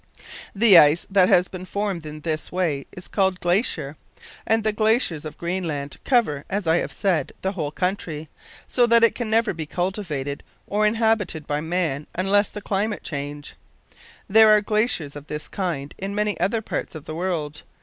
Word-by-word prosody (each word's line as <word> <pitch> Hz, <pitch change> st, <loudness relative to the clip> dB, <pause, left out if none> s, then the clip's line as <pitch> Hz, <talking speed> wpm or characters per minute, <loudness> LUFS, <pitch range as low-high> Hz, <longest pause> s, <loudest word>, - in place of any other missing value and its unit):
The 200 Hz, -4 st, +8 dB
ice 150 Hz, +2 st, +4 dB
that 190 Hz, -2 st, +5 dB
has 180 Hz, +1 st, +4 dB
been 185 Hz, -1 st, -8 dB
formed 190 Hz, -4 st, -3 dB
in 150 Hz, 0 st, -8 dB
this 155 Hz, -1 st, -3 dB
way 165 Hz, -7 st, -1 dB
is 180 Hz, -2 st, -8 dB
called 190 Hz, -2 st, 0 dB
glacier; 175 Hz, -, 0 dB, 0.5 s
and 225 Hz, 0 st, +2 dB
the 215 Hz, 0 st, +1 dB
glaciers 215 Hz, -, +1 dB
of 155 Hz, -, -7 dB
Greenland 170 Hz, -5 st, -3 dB
cover, 215 Hz, -, +1 dB
as 200 Hz, 0 st, -2 dB
I 160 Hz, +1 st, +3 dB
have -, -, -2 dB
said, 175 Hz, -8 st, 0 dB
the 190 Hz, -, 0 dB
whole 160 Hz, -7 st, -3 dB
country, 160 Hz, -2 st, -3 dB, 0.4 s
so 245 Hz, -1 st, +3 dB
that 235 Hz, 0 st, +5 dB
it 230 Hz, -, +5 dB
can 240 Hz, -3 st, -4 dB
never 225 Hz, 0 st, +2 dB
be 160 Hz, -3 st, -6 dB
cultivated 170 Hz, -7 st, -3 dB, 0.2 s
or 210 Hz, +1 st, +1 dB
inhabited 220 Hz, -8 st, 0 dB
by 150 Hz, 0 st, -2 dB
man 160 Hz, -4 st, -2 dB
unless 195 Hz, +3 st, +2 dB
the 210 Hz, -, -8 dB
climate 205 Hz, +2 st, -2 dB
change. 145 Hz, 0 st, -6 dB, 0.7 s
There 220 Hz, +2 st, +7 dB
are 210 Hz, 0 st, +6 dB
glaciers 210 Hz, -, 0 dB
of 145 Hz, 0 st, -10 dB
this 150 Hz, 0 st, -5 dB
kind 165 Hz, -8 st, -3 dB
in 195 Hz, +1 st, -4 dB
many 210 Hz, 0 st, 0 dB
other 205 Hz, +6 st, 0 dB
parts -, -, -4 dB
of 155 Hz, -, -9 dB
the 155 Hz, -, -6 dB
world. 160 Hz, -4 st, -3 dB
180 Hz, 180 wpm, -23 LUFS, 155-210 Hz, 0.7 s, The